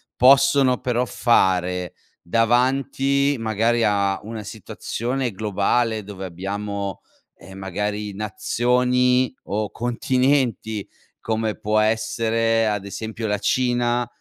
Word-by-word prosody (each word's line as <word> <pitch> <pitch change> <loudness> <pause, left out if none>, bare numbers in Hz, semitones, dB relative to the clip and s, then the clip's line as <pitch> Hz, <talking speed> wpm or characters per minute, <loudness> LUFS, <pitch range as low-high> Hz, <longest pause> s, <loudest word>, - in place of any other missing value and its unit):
possono 135 0 +5
però 125 0 0
fare, 90 -7 +1 0.3
davanti 135 +6 +2
magari 115 +1 +1
a 100 -2 +1
una 110 0 -7
situazione 120 +4 -4
globale 110 +2 0
dove 95 -1 -7
abbiamo, 100 +2 -4 0.4
ehm, 95 0 -12
magari 105 +2 -3
nazioni 125 +4 +1
o 105 0 -2
continenti, 120 -3 0 0.3
come 110 -1 -2
può 110 +1 +1
essere 115 +1 +1
ad 105 -2 -2
esempio 110 +3 -5
la 105 -1 0
Cina, 120 +1 +1
110 Hz, 95 wpm, -22 LUFS, 105-125 Hz, 0.4 s, possono